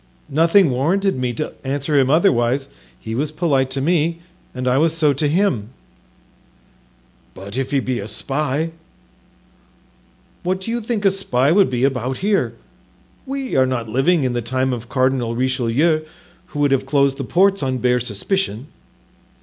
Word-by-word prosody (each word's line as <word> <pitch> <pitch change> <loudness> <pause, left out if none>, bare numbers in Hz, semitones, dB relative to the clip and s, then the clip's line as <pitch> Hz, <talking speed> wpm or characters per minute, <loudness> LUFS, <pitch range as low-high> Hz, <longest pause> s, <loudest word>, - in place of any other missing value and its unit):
"Nothing 165 +2 +4
warranted 180 +10 +1
me 125 -1 -1
to 150 +6 -4
answer 140 +2 0
him 130 -1 +2
otherwise; 135 -5 +2 0.3
he 110 - -6
was 145 +5 -1
polite 140 -5 +1
to 135 +1 -2
me 165 +2 +1 0.3
and 125 0 -4
I 125 +2 +3
was 160 +1 +2
so 150 -3 +3
to 145 +3 0
him." 145 - +1 1.7
"But 100 +3 -9
if 135 0 -2
he 140 - +1
be 130 -2 -2
a 100 - -5
spy——" 145 +8 -2 1.7
"What 185 +1 -1
do 225 - -4
you 240 0 -2
think 215 -2 -2
a 195 - +6
spy 140 -8 +1
would 195 +2 +4
be 125 -1 -1
about 130 -1 0
here? 205 -1 +1 0.7
We 270 -1 -3
are 130 -1 +4
not 120 -3 -3
living 145 +7 +2
in 130 -2 0
the 120 - -1
time 130 +2 -1
of 120 -1 -6
Cardinal 130 -3 0
Richelieu, 130 +5 +1 0.5
who - - -10
would 145 -1 +3
have 135 0 +1
closed 140 -1 +2
the 140 - -4
ports 195 +8 +2
on 130 -2 -1
bare 125 0 +2
suspicion." 125 - -2
135 Hz, 165 wpm, -20 LUFS, 125-165 Hz, 1.7 s, a